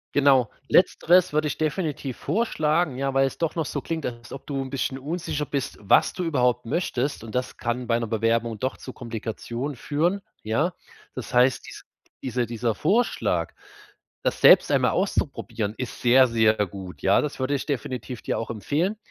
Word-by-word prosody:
Genau. 135 -5 +5 0.2
Letzteres 180 -1 +4
würde 155 0 +2
ich - - -3
definitiv 155 -5 -2
vorschlagen. 155 - 0
Ja, 135 0 -1
weil 135 0 +4
es - - -7
doch 165 -1 -1
noch 165 -2 -1
so 145 - -3
klingt, 160 0 -4
als 120 +1 -8
ob 135 - -9
du 140 -2 -2
'n 130 - -5
bisschen 135 -1 -2
unsicher 150 +1 -3
bist, 140 -2 -3
was 100 - +4
du 180 - -3
überhaupt 125 -6 +1
möchtest. 140 -2 -1
Und 115 +1 -8
das 125 - -2
kann 120 +1 -2
bei 115 0 +1
'ner 115 - -3
Bewerbung 115 0 0
doch 130 +3 -2
zu 130 - -8
Komplikationen 120 +3 -5
führen, 170 +10 0 0.2
ja? 145 +12 0 0.4
Das - - -6
heißt, 125 +1 +3
diese - - -10 0.4
diese 125 -1 -1
dieser 115 -1 -1
Vorschlag, 160 - +1 0.7
das - - -1
selbst - - +7
einmal - - +3
auszuprobieren, 105 -2 -1
ist 130 -2 -6
sehr, 130 +2 +6
sehr 110 -2 +3
gut, 95 -1 -9
ja? 95 +1 +4
Das 150 -2 -4
würde 130 +2 0
ich 135 - -3
definitiv 125 -3 -4
dir - - -2
auch 115 - -5
empfehlen. 155 - -1
130 Hz, 180 wpm, -25 LUFS, 115-150 Hz, 0.7 s, selbst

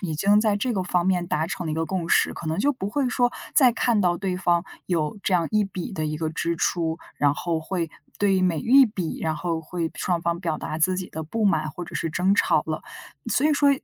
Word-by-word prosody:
已 170 -5 -3
经 200 +7 +4
在 215 -2 +2
这 245 +4 -1
个 195 -4 -1
方 180 0 0
面 180 -2 +1
达 155 -1 0
成 175 0 -4
了 - - -2
一 - - -1
个 165 - 0
共 175 -1 -3
识， - - +3
可 170 - -8
能 160 +3 -1
就 285 +7 +2
不 200 -7 -4
会 270 +5 0
说 245 0 +2 0.2
再 260 -4 +6
看 235 -2 +1
到 175 -3 +2
对 190 0 -2
方 175 -1 +2 0.2
有 165 +1 -1
这 190 - +1
样 170 -2 +2
一 215 -1 +3
笔 195 -1 -5
的 155 -4 -2
一 150 - -3
个 155 0 -2
支 170 +1 -2
出， 165 -1 0 0.2
然 145 -1 +3
后 165 +1 -2
会 165 0 -3 0.3
对 195 -2 +3
每 175 -4 +1
一 265 - +6
笔， 185 -6 -4
然 160 -1 -1
后 165 +1 -2
会 165 0 -3
双 175 -2 -1
方 170 0 -1
表 165 -4 -1
达 155 - -5
自 185 +3 +2
己 185 -1 -5
的 160 - -5
不 215 +8 -2
满 195 -6 +2
或 175 +3 -7
者 - - -11
是 - - -1
争 180 +5 +2
吵 - - +3
了。 - - -3 0.5
所 295 - +3
以 310 - +3
说 285 0 +3
180 Hz, 275 characters per minute, -24 LUFS, 160-200 Hz, 0.5 s, 再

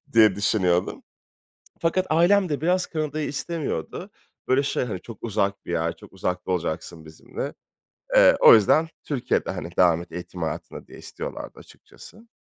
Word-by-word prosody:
diye 110 -4 +6
düşünüyordum. 95 -3 0 0.8
Fakat 175 +3 +1
ailem 175 +4 +4
de 145 -1 -2
biraz 180 +2 +1
Kanada'yı 155 -1 -3
istemiyordu. 145 - -4 0.4
Böyle 130 +2 +3
şey 140 - -1
hani 95 -7 -5
çok 115 -3 -10
uzak 100 -3 -1
bir - - -6
yer, 85 -1 -1
çok - - -16
uzakta 90 +1 -3
olacaksın 85 -2 -3
bizimle. 80 0 -7 0.6
Eee, - - +7
o - - +9
yüzden 150 +10 +4 0.2
Türkiye'de, 140 -5 -1
hani, 85 - -6
devam 85 -2 +4
et 85 - -12
eğitim 90 +1 -8
hayatına 80 - -5
diye - - -13
istiyorlardı - - -8
açıkçası. 225 +2 -16
110 Hz, 150 wpm, -24 LUFS, -, 0.8 s, o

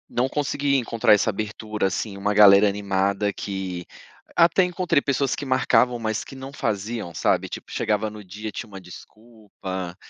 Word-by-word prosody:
Não 125 +2 0
consegui 140 0 0
encontrar 115 -3 +3
essa 105 +2 +3
abertura 105 0 -3
assim, 100 +2 -4
uma 105 +1 0
galera 100 0 +7
animada 100 0 0
que 95 -3 -5 0.5
até 170 +2 +5
encontrei 180 -3 +1
pessoas 140 -1 0
que - - -6
marcavam, 130 -2 +2
mas 110 -1 -2
que - - -12
não 135 +1 -9
faziam 110 -6 -3
sabe - - 0
tipo - - -8
chegava 105 0 0
no 105 0 -10
dia 105 +3 -7
tinha 115 - -6
uma 100 -2 -10
desculpa, 95 -1 -9
105 Hz, 160 wpm, -23 LUFS, 100-125 Hz, 0.5 s, galera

